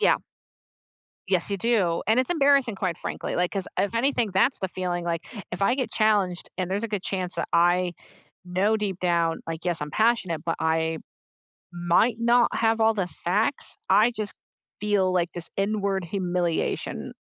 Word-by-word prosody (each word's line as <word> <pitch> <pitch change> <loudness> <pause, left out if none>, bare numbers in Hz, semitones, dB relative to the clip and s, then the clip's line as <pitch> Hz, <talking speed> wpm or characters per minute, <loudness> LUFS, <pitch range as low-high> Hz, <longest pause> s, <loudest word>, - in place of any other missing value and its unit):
Yeah. - - +4 1.1
Yes, 185 -1 +1
you 200 - 0
do, 195 -6 +1
and 225 +3 +4
it's 260 +7 +1
embarrassing, 280 - +3
quite 185 -4 -2
frankly, - - -4
like, 180 0 0
'cause 195 -2 -3
if 205 +3 0
anything, 240 -3 +1
that's 190 +8 +3
the 190 - -2
feeling, 175 -1 -3
like, 170 0 -2 0.3
if 180 +3 -3
I 240 +5 +4
get 255 -5 -2
challenged 205 -5 +1
and 185 -1 -1
there's 200 +3 -1
a 230 - -2
good 205 -3 -3
chance 185 -2 -3
that - - -2
I 175 +1 +3 0.5
know 190 +5 +1
deep 200 -4 -3
down, 170 -2 +1
like, 165 +1 -5
"Yes, 175 -3 -1
I'm 150 - -3
passionate, 190 -7 +1
but 165 - 0
I 160 0 +1 0.8
might 175 +7 +2
not 235 +1 +3
have 225 0 +2
all 220 0 +4
the 195 -4 -1
facts," 195 - -1
I 215 +5 +5
just 215 -3 -4 0.5
feel 200 -3 +2
like 175 -1 0
this 175 -1 -7
inward 200 -1 0
humiliation. 175 -2 -2
190 Hz, 175 wpm, -25 LUFS, 175-220 Hz, 1.1 s, I